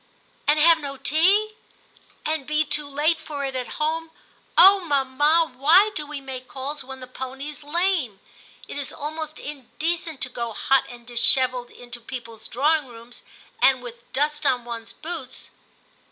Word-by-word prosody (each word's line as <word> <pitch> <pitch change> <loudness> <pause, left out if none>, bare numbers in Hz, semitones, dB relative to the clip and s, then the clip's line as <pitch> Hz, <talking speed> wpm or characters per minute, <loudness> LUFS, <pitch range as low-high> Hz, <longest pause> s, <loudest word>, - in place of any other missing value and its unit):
* - - -36
And 295 +1 +4
have 330 +1 +6
no 280 -2 -6
tea, 380 +10 +2 0.7
and 310 -3 -2
be 305 +1 +1
too 300 -1 -1
late 305 +4 +1
for 290 -3 -5
it 270 -1 -4
at 250 -2 -4
home! 320 +2 -1 0.5
Oh, 390 +1 +9
mamma, 295 0 +2
why 340 +11 +5
do 300 -1 -3
we 300 -1 -6
make 260 -2 -8
calls 275 +2 -5
when 265 0 -9
the - - -7
pony's 265 +4 -7
lame? 305 - 0 0.5
It - - -5
is 280 - -2
almost 310 +1 -5
in 280 -4 -8
decent 325 -2 -1
to - - -1
go 235 -2 -4
hot 270 +5 +2
and 240 -1 -12
dishevelled 250 +1 +3
into 245 0 -10
people's 230 -2 -8
drawing 295 +3 +1
rooms, 235 0 -12 0.4
and 260 -2 +4
with 235 -1 -11
dust 295 +2 0
on 250 -4 +2
one's 230 -1 -7
boots.' 310 -6 -8
280 Hz, 165 wpm, -24 LUFS, 255-315 Hz, 0.7 s, Oh